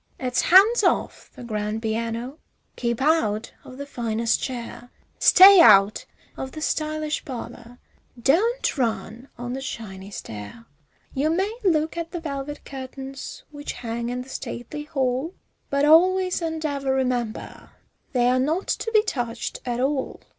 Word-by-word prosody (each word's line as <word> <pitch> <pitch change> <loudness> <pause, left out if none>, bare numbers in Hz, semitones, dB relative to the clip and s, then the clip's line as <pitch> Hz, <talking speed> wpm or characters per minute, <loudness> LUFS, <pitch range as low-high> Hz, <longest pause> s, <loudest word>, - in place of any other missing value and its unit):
It's 250 -1 0
hands 400 +7 +6
off - - 0
the - - -10
grand 215 -1 -3
piano, 230 +5 -3 0.4
keep 235 +1 -2
out 240 -9 +1
of 255 - -12
the 280 - -6
finest 230 -4 -1
chair, 245 -1 -6 0.3
Stay 385 +1 +9
out 200 -2 +6 0.3
of 265 - -6
the 310 - -7
stylish 310 0 -2
parlor, 245 -2 -8 0.4
don't 385 - +1
run 235 +1 -2
on 245 0 -5
the 265 - -4
shiny 200 -7 -7
stair; 110 - -9 0.5
You 285 +4 0
may 385 +7 0
look 320 -3 +1
at 335 -1 -3
the 345 - -5
velvet 290 -2 -6
curtains 270 0 -8
which 290 -1 -6
hang 235 0 -4
in 250 +1 -3
the 260 - -16
stately 280 +4 -6
hall, 270 +3 -1 0.3
But 280 +1 +2
always 365 +4 +4
and 320 -1 -3
ever 280 -2 -1
remember, 250 -4 -3 0.4
they're 250 -1 +2
not 315 +8 -1
to 450 - -1
be 430 -1 +5
touched 240 - -4
at 240 0 -1
all. 265 +1 -1
265 Hz, 145 wpm, -24 LUFS, 235-310 Hz, 0.5 s, Stay